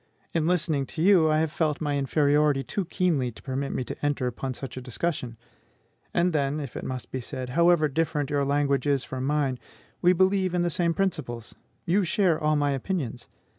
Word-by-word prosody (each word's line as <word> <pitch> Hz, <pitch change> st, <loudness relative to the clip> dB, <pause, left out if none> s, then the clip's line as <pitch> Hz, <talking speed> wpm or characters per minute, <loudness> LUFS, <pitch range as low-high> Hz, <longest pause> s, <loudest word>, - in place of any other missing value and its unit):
In 165 Hz, -1 st, +1 dB
listening 155 Hz, -6 st, +1 dB
to 160 Hz, -, -5 dB
you, 180 Hz, -5 st, +5 dB
I 155 Hz, -, +3 dB
have 160 Hz, -1 st, +1 dB
felt 155 Hz, -3 st, 0 dB
my 145 Hz, -2 st, -1 dB
inferiority 145 Hz, 0 st, +2 dB
too 195 Hz, +5 st, -3 dB
keenly 160 Hz, -9 st, 0 dB
to -, -, -15 dB
permit 135 Hz, +1 st, -3 dB
me -, -, -2 dB
to -, -, -8 dB
enter 145 Hz, -3 st, 0 dB
upon 125 Hz, +1 st, -3 dB
such 135 Hz, -, -7 dB
a 130 Hz, -, -5 dB
discussion. 125 Hz, -1 st, -3 dB, 0.7 s
And 175 Hz, 0 st, +1 dB
then, 145 Hz, 0 st, 0 dB
if 140 Hz, -5 st, -6 dB
it -, -, -5 dB
must 130 Hz, -1 st, -5 dB
be 130 Hz, -, -3 dB
said, 125 Hz, +1 st, -6 dB
however 170 Hz, +2 st, +4 dB
different 150 Hz, -1 st, -1 dB
your 145 Hz, -1 st, +1 dB
language 140 Hz, -1 st, +1 dB
is 140 Hz, -3 st, +2 dB
from 130 Hz, 0 st, -4 dB
mine, 140 Hz, -3 st, 0 dB, 0.4 s
we 180 Hz, +1 st, +5 dB
believe 190 Hz, 0 st, +2 dB
in 175 Hz, -, +2 dB
the 175 Hz, -, 0 dB
same 170 Hz, 0 st, 0 dB
principles; 150 Hz, -, -2 dB, 0.3 s
you 190 Hz, +4 st, +2 dB
share 180 Hz, -1 st, +2 dB
all 155 Hz, 0 st, +3 dB
my 145 Hz, -1 st, +1 dB
opinions. 135 Hz, -4 st, -3 dB
145 Hz, 200 wpm, -26 LUFS, 135-170 Hz, 0.7 s, you